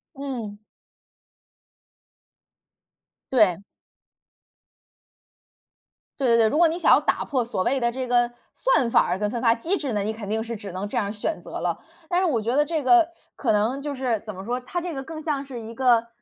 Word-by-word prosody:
嗯。 250 -7 -5 2.7
对。 210 -9 +4 2.6
对 270 - +1
对 230 - +5
对， 225 -1 +5
如 255 - 0
果 335 0 +6
你 335 +2 -3
想 - - +4
要 - - +5
打 - - 0
破 260 -4 0
所 225 -5 -2
谓 265 +6 +1
的 235 - +2
这 255 +1 -4
个 240 0 +2 0.2
算 - - +2
法 - - +4
儿 180 +2 -1
跟 210 0 0
分 235 +1 -3
发 230 -2 +5
机 325 +12 -1
制 280 -7 -3
呢， 210 -2 0
你 215 +2 -2
肯 215 -2 -7
定 220 +1 0
是 230 0 -4
只 205 -2 -8
能 185 +3 -4
这 - - -4
样 205 -3 0
选 210 +9 -3
择 - - -7
了。 - - -2 0.3
但 355 0 +2
是 - - +2
我 265 -10 +1
觉 235 +4 -1
得 295 - +5
这 310 0 -2
个 340 +4 +5 0.3
可 240 - 0
能 220 +6 +1
就 290 -1 -4
是， 250 -5 -1
怎 215 - -6
么 190 +1 -8
说？ 245 +3 -2
它 260 +8 -3
这 350 -1 -5
个 270 -2 -5
更 315 +2 -7
像 295 -3 -2
是 260 -3 -7
一 225 0 -9
个 235 -2 +3
240 Hz, 220 characters per minute, -24 LUFS, 220-280 Hz, 2.7 s, 果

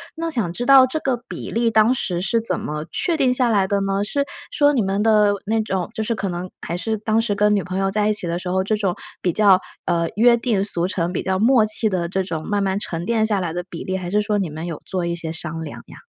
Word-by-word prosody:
那 330 0 -3
想 220 - -1
知 245 - -3
道 270 -1 +8
这 310 +5 -3
个 265 -4 0
比 - - -6
例 230 0 +1
当 220 +4 +4
时 175 -7 -2
是 225 +5 +1
怎 230 - -2
么 150 +1 -4
确 340 -3 0
定 260 -3 +3
下 250 -1 +2
来 200 -3 +3
的 200 0 +1
呢？ 195 +1 0
是 280 +7 -1 0.3
说 290 -10 +4
你 235 -6 +2
们 195 +2 0
的 210 -2 +4
那 225 +2 +1
种 190 -4 -2
就 220 - -1
是 230 - -1
可 200 -3 -3
能 180 +1 -5
还 170 - -4
是 220 +4 -2
当 215 +1 +1
时 210 -3 -1
跟 210 +1 +3
女 200 - 0
朋 185 +1 -4
友 195 - +1
在 210 +1 +1
一 - - +2
起 185 -4 -3
的 170 +1 -1
时 180 0 -5
候， 190 +1 +1
这 215 - +1
种 195 -4 0 0.3
比 180 - +1
较， 195 -1 +5 0.3
呃， 170 -1 +1
约 235 +1 +6
定 230 -5 0
俗 175 -4 0
成、 175 -2 -2
比 - - -2
较 190 0 0
默 230 0 +4
契 215 +1 +2
的， 180 -3 -1
这 190 +1 0
种 165 -4 -4
慢 205 -1 0
慢 195 0 0
沉 170 -4 -4
淀 225 -1 +1
下 210 -2 0
来 175 -3 -2
的 175 +1 -3
比 165 - -7
例， 190 0 -2
还 180 -1 -5
是 210 +2 +2
说 210 0 0
你 190 -5 -1
们 160 +3 -6
有 165 - -5
做 180 -2 -2
一 170 0 -1
些 165 -2 -5
商 165 -1 -4
量 150 - -8
呀？ - - -13
200 Hz, 300 characters per minute, -21 LUFS, 180-225 Hz, 0.3 s, 道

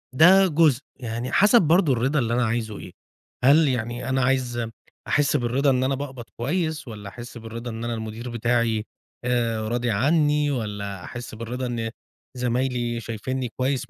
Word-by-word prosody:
ده 190 +6 +7
جزء، 155 -5 +3 0.2
يعني 120 0 -4
حسب 210 +4 +6
برضو 165 -2 +4
الرضا 130 +5 +1
اللي 115 -2 0
أنا 125 +1 +2
عايزه 110 -2 -2
إيه، - - -9 0.5
هل 145 +4 +6
يعني 120 -1 -2
أنا 130 0 +1
عايز 125 -2 0 0.4
أحس 145 0 +2
بالرضا 130 +3 +1
إن 130 -1 +2
أنا 135 +1 +1
باقبض 135 -3 -6
كويس 160 +4 -1
والّا 105 -3 -7
أحس 120 +4 -10
بالرضا 115 +1 -6
إن 115 +1 -6
أنا 120 0 -2
المدير 110 +2 -5
بتاعي 115 -2 0 0.4
آآ، 115 -3 0
راضي 120 0 0
عني 150 +5 +2
والّا 100 -6 -4
أحس 120 -2 -7
بالرضا 120 +3 -4
إن 115 -2 -2 0.5
زمايلي 125 -1 -1
شايفينني 120 +3 -4
كويس 130 0 -1
120 Hz, 160 wpm, -24 LUFS, 115-135 Hz, 0.5 s, ده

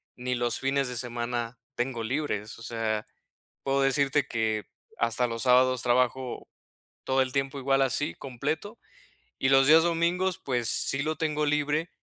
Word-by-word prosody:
ni 125 +1 -3
los 120 -1 0
fines 135 0 0
de 125 - -4
semana 120 -1 -3 0.2
tengo 120 -2 -2
libres. 110 -4 -3
O 115 - -12
sea, 110 -2 -2 0.6
puedo 135 0 +1
decirte 140 0 +2
que 110 -3 -1 0.3
hasta 115 +1 +1
los 115 +1 -3
sábados 130 0 +4
trabajo 125 +1 0 0.6
todo 130 0 +2
el 130 -1 -3
tiempo 135 +1 -1
igual 135 0 +2
así 135 +3 +1
completo 150 - -4 0.6
y 135 - +2
los 135 0 +5
días 160 +2 +7
domingos, 175 +2 +1
pues 125 -3 -1
sí, 135 - +1
lo 155 0 -2
tengo 150 -1 0
libre, 150 +3 0
130 Hz, 155 wpm, -27 LUFS, 120-145 Hz, 0.6 s, días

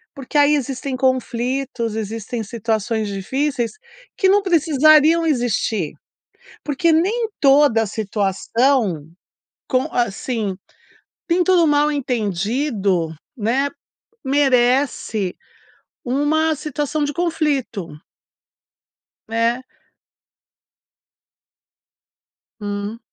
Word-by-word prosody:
porque 275 +2 -4
aí 290 +1 +5
existem 270 0 -3
conflitos, 255 -2 -1
existem 225 +2 -4
situações 220 0 -2
difíceis 245 +5 -2 0.4
que 380 - +3
não 410 +1 +5
precisariam 315 -2 +4
existir, 225 - 0 0.7
porque 300 +3 +1
nem 425 +8 +1
toda 275 -5 +4
situação 210 - 0 0.6
com, 255 -1 +2
assim, 225 -3 -2 0.7
nem 350 +1 +3
todo 345 -3 +4
mal 295 0 +3
entendido, 210 - -1 0.2
né, 250 +6 0 0.6
merece 255 -7 +1 0.7
uma 305 +5 +1
situação 300 0 -3
de 290 - -2
conflito. 290 - -1 1.4
É. 230 +2 0 3.0
Hum. 205 +2 -4
255 Hz, 75 wpm, -20 LUFS, 220-295 Hz, 3.0 s, aí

